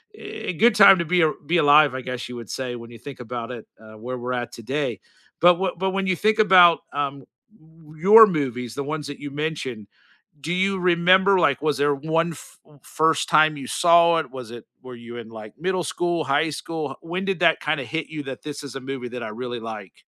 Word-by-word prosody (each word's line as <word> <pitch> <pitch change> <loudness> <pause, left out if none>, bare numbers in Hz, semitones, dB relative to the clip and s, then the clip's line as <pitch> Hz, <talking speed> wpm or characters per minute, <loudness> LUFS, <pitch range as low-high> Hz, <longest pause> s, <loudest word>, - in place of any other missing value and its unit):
eh, 185 - -6
good 225 +6 +3
time 200 -3 +7
to 170 - -1
be 175 +1 +2
ar 155 - +2
be 170 +4 -1
alive, 145 -3 +5
I 130 - -4
guess 125 0 -6
you 125 - -8
would 115 -3 -9
say, 125 -2 -4
when 115 0 -11
you 115 - -13
think 140 +2 -10
about 120 0 -6
it, 120 -3 -9
uh, 110 0 -15
where 125 +3 -6
we're 125 +1 -4
at 120 -1 -4
today. 130 -1 -4 0.4
But 175 +1 +6
wh 185 -1 -3
but 190 0 -1
when 195 0 -2
you 185 - +1
think 215 +5 +1
about, 180 -5 +6
um, 140 -1 -3 0.7
your 210 +7 +8
movies, 125 - -3
the 140 - -3
ones 150 0 -5
that 145 - -8
you 145 -1 -7
mentioned, 140 -8 -5 0.5
do 160 +5 -4
you 190 +1 0
remember, 185 +2 +3
like, 145 -5 +2
was 150 -3 0
there 145 0 +2
one 165 +3 -1
f 145 - -14 0.2
first 160 +1 0
time 155 -1 +4
you 135 -3 -8
saw 170 -1 +4
it? 160 - -4
Was 125 -3 -9
it 120 -2 -10 0.2
were 130 -1 -10
you 120 0 -11
in 115 -2 -9
like 110 -1 -11
middle 185 +2 -1
school, 175 +2 -2
high 145 +3 +1
school? 150 -1 -5
H - - -12
when 180 +3 -4
did 195 -3 -2
that 165 -2 +3
kinda 150 -2 -1
hit 160 +3 -4
you 155 -1 -6
that 135 -2 -8
this 150 -1 -7
is 140 -2 -9
a - - -5
movie 130 -1 -6
that 125 0 -7
I - - -5
really 120 +2 -6
like? 110 -5 -10
145 Hz, 230 wpm, -22 LUFS, 125-170 Hz, 0.7 s, your